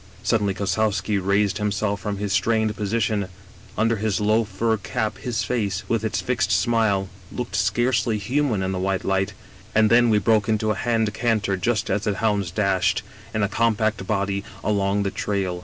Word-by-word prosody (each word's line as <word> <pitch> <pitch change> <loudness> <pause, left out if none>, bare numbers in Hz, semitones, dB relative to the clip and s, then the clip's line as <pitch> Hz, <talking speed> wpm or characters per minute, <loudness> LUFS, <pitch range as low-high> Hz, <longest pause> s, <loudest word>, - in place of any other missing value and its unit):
" - - -22
Suddenly 100 -4 +1
Kossowski 100 0 0
raised 100 +2 +1
himself 105 -1 -1
from 105 0 -3
his 100 -1 -2
strained 110 -1 +1
position; 105 -1 0 0.5
under 115 +1 +2
his 105 -2 0
low 110 +2 +3
fur 110 +2 0
cap 105 +2 -3
his 115 -3 -2
face, 100 -7 -1
with 115 -1 0
its 110 - -1
fixed 120 -5 0
smile, 100 0 +2 0.2
looked 125 -1 -4
scarcely 120 -2 +1
human 120 -1 0
in 95 - -1
the 95 - -2
white 95 0 -1
light: 95 0 0 0.4
and 110 -1 +4
then 120 0 +5
we 110 - +4
broke 110 0 +2
into 110 0 +1
a - - +2
hand 110 0 0
canter 110 -4 0
just 105 +2 -1
as 105 +2 0
the 105 -2 0
hounds 105 -4 0
dashed, 95 0 +1 0.3
in 110 - 0
a - - +3
compact 110 -2 0
body, 100 -1 -1 0.2
along 100 -1 +1
the 100 - -1
trail. 95 -4 -2
105 Hz, 180 wpm, -23 LUFS, 100-110 Hz, 0.5 s, then